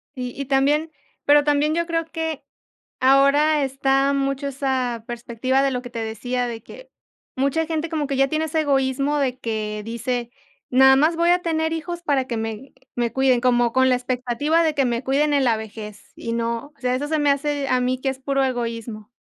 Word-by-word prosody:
Y 250 -1 -4
y 275 - -3
también, 290 +4 +1 0.3
pero 290 0 +6
también 295 +1 +2
yo 340 0 0
creo 330 -1 -1
que 320 -2 -4 0.6
ahora 280 +3 +4
está 270 +1 +1
mucho 275 0 -1
esa 260 -4 -2
perspectiva 240 +2 -1
de 275 - +2
lo 250 0 -3
que 245 - -9
te 230 - -6
decía, 245 +3 -2
de 230 -2 -6
que - - -13 0.5
mucha 280 +4 0
gente 320 0 -2
como 310 -3 -2
que 275 - -2
ya 270 +1 +3
tiene 310 +2 -1
ese 315 0 0
egoísmo 275 0 +1
de 260 -2 -1
que 215 -2 -3
dice: 235 +1 -3 0.4
"Nada 265 +1 +7
más 310 +5 +3
voy 340 +1 +3
a 355 0 +3
tener 320 -1 0
hijos 345 +2 -4
para 280 -5 +1
que 235 - -2
me 225 +4 -5 0.2
me 235 -2 -1
cuiden". 265 -1 +3
Como 240 -2 +2
con 260 0 +3
la 255 - +3
expectativa 255 +6 0
de 315 -2 +1
que 275 -2 +2
me 235 0 -1
cuiden 290 +3 +1
en 280 - +3
la 230 -3 +3
vejez, 210 -1 -9
y 230 - -5
no. 235 +5 -3
O, - - -30
sea, 250 0 0
eso 290 +3 -2
se 315 -1 0
me 290 -1 +3
hace 285 0 -2
a 255 - +2
mí 255 +1 -1
que 270 0 0
es 265 0 -7
puro 275 0 0
egoísmo. 230 -4 -4
270 Hz, 210 wpm, -22 LUFS, 245-295 Hz, 0.6 s, Nada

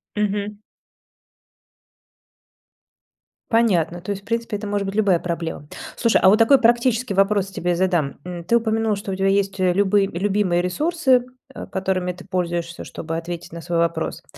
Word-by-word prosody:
Мгм. 205 0 -2 2.9
Понятно. 175 -7 +2
То 205 - -5
есть, 195 0 -5
в - - -25
принципе, 230 -2 -2
это 210 - -7
может 200 -1 -1
быть 195 - -4
любая 195 -6 +3
проблема. 165 -4 -4 0.3
Слушай, 230 - +3
а 190 - +7
вот 210 - +5
такой 260 +4 +6
практический 240 -1 +2
вопрос 195 0 +2
тебе 180 -2 -2
задам. 175 -6 0
М, 175 -1 -6
ты 235 +7 +1
упомянул, 220 -1 0
что 200 0 -6
у - - -2
тебя 195 +1 0
есть, 195 0 +1
э, 185 -1 +3
любые 200 0 +3
любимые 190 -1 0
ресурсы, 260 - +1 0.3
э, - - -8
которыми 185 -1 -1
ты 185 +1 -13
пользуешься, 175 -2 -3
чтобы 165 0 -6
ответить 170 0 -6
на 170 0 -8
свой 170 +1 -2
вопрос. 170 0 -1
195 Hz, 165 wpm, -22 LUFS, 175-210 Hz, 2.9 s, а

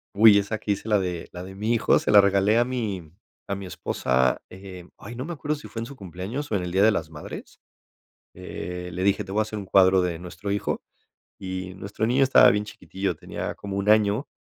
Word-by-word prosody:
Uy, 105 0 +8
esa 100 +2 -1
que 105 - -2
hice 105 - -8
la 105 -2 +3
de 90 -3 -4
la 90 - -7
de 95 +1 -10
mi 110 +4 0
hijo, 115 - +3
se - - 0
la 105 - +9
regalé 100 +3 +3
a 120 - +3
mi 105 -11 -4 0.4
a 100 - -2
mi 100 0 -7
esposa. 65 -7 0
Eh, 95 -2 -10
ay, 115 +4 -9
no 130 +3 -5
me 170 - -5
acuerdo 150 -1 -2
si 150 - -10
fue 115 - -7
en 115 - -5
su 140 - -10
cumpleaños 100 - -6
o - - +1
en 95 - 0
el 90 - -4
día 95 +2 +3
de 110 - +6
las 80 -7 -2
madres. 75 -2 -10 0.8
Eh, 90 0 -6
le 90 - -3
dije, 100 +1 +2
te 95 - -8
voy 105 - +1
a - - +4
hacer 110 0 -5
un 100 - -7
cuadro 95 -1 +5
de 90 -2 -1
nuestro 90 +4 -7
hijo 100 +1 -2 0.6
y 95 -1 -5
nuestro 100 +3 -4
niño 125 +4 +2
estaba 135 - +7
bien 105 0 0
chiquitillo, 95 -1 -4
tenía - - -6
como 100 -1 -6
1, 100 +1 -1
año 105 +4 +3
100 Hz, 235 wpm, -25 LUFS, 95-110 Hz, 0.8 s, la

